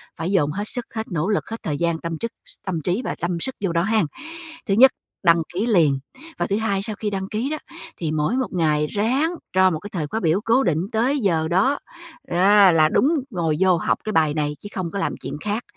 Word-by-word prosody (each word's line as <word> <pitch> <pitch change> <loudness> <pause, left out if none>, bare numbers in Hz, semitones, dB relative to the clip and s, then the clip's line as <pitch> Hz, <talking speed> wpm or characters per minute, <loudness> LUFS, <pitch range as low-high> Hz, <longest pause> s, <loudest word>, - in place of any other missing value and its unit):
phải 165 +4 -3
dồn 150 -7 +2
hết 200 +6 -3
sức, 245 -2 -1
hết 220 0 -3
nỗ 165 +1 -1
lực, 210 - -1
hết 225 - -7
thời 155 -8 -2
gian 170 +1 0
tâm 170 -1 -4
chức 230 +5 -4
s - - -7
tâm 175 -5 -2
trí 180 - -1
và - - -2
tâm 170 0 -2
sức 265 +9 0
vô 180 - 0
đó 170 0 +1
ha. 215 +2 +2 0.6
Thứ 200 - 0
nhất, 260 +5 +7 0.3
đăng 170 -1 +5
ký 195 +5 -1
liền! 160 - +3 0.4
Và - - -1
thứ 200 - 0
hai, 215 -3 0
sau 215 0 -3
khi 210 0 -3
đăng 190 -1 -3
ký 230 +6 -2
đó, 310 - -2 0.4
thì 160 -3 -2
mỗi 155 +9 0
1 260 - 0
ngày 150 -4 +1
ráng 255 - +1 0.2
cho 185 0 +5
một 160 - -2
cái 205 - -9
thời 155 -5 -2
khóa 220 - -2
biểu 175 0 +1
cố 235 +5 +3
định 160 - +1
tới 245 +6 +1
giờ 165 -8 +1
đó, 195 - +2 0.5
a, 195 +2 +5
là 155 -2 +4
đúng 265 - +3 0.2
ngồi 165 -5 0
vô 185 -2 +4
học - - 0
cái 215 - -3
bài 155 -3 +3
này 150 -1 -1
chứ 205 - -9
không 180 -3 -3
có 200 - -3
làm - - -1
chuyện 145 - -5
khác. 210 +3 -2
190 Hz, 245 wpm, -22 LUFS, 165-220 Hz, 0.6 s, nhất